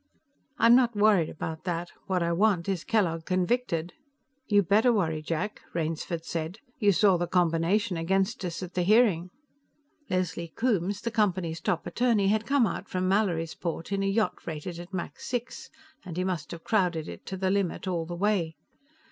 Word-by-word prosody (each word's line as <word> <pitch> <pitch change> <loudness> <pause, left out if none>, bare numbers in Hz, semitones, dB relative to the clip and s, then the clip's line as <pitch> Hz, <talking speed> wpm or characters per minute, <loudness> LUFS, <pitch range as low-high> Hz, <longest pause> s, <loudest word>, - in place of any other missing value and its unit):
"I'm 230 -2 +6
not 240 -3 +3
worried 205 -5 +4
about 160 0 -6
that. 175 -1 -3 0.2
What 185 -2 +1
I 170 - 0
want 185 -1 +2
is 190 -4 -1
Kellogg 175 -8 +1
convicted." 185 -2 0 0.5
"You 205 -1 +4
better 215 +7 +4
worry, 160 -8 0
Jack," 165 +7 -3
Rainsford 165 0 -2
said. 165 +3 -4 0.2
"You 205 -4 +5
saw 195 -1 +4
the 175 0 -1
combination 180 +3 +1
against 195 +7 0
us 175 0 -4
at 180 0 -7
the 180 - 0
hearing." 190 -3 +4 0.8
Leslie 170 -3 -2
Coombes, 205 -5 0
the 235 - -2
Company's 185 -7 0
top 170 +1 -1
attorney, 230 -5 +2
had 215 +1 +1
come 275 -3 +4
out - - -4
from 185 0 -1
Mallorysport 170 -3 -1
in 200 0 0
a 195 - +1
yacht 210 +2 0
rated 165 +2 -5
at 175 +2 -9
Mach 185 -3 -5
6, 245 -1 -4 0.3
and 175 -3 -7
he 185 - +1
must 175 -6 -2
have 170 -1 -8
crowded 180 -7 +1
it - - -9
to 190 - -4
the 190 0 0
limit 195 -1 -1
all 170 -3 -1
the 175 - -5
way. 180 -4 0
185 Hz, 175 wpm, -28 LUFS, 170-205 Hz, 0.8 s, I'm